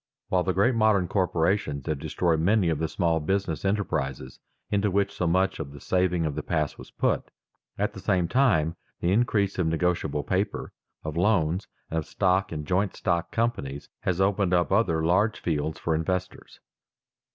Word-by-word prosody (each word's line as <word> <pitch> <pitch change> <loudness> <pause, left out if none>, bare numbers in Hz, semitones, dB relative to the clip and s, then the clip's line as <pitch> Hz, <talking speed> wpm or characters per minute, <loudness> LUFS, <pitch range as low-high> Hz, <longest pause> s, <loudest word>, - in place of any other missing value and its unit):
While 90 - +2
the 90 +2 0
great 100 +7 +3
modern 110 -5 +3
corporations 85 -6 0
have 75 -3 -2
destroyed 80 +2 0
many 95 +2 +3
of 80 -3 0
the 80 - 0
small 85 0 +1
business 90 -1 -1
enterprises 70 - -2 0.3
into 105 0 +2
which 100 +1 +1
so 90 - -1
much 95 +3 +1
of 70 -3 -6
the 70 - -10
saving 90 +1 +1
of 75 - -1
the - - -3
past 75 -1 -2
was - - -10
put, - - -1 0.5
at - - -1
the - - -8
same 90 -2 +1
time 90 - +2 0.2
the 85 - +1
increase 100 -3 +1
of 85 - +2
negotiable 80 -3 0
paper, 95 +2 -2 0.3
of 80 0 -4
loans, 90 -2 +2 0.2
and 80 - +1
of 80 - -6
stock 95 0 +1
in 75 -2 -4
joint 95 +5 0
stock 85 -1 -1
companies, 70 - -2
has 90 -1 -1
opened 95 -1 +2
up 85 +1 +1
other 85 -6 +2
large 100 +6 +2
fields 80 -1 -2
for 80 - -1
investors. 90 +3 -3
90 Hz, 175 wpm, -26 LUFS, 80-100 Hz, 0.5 s, great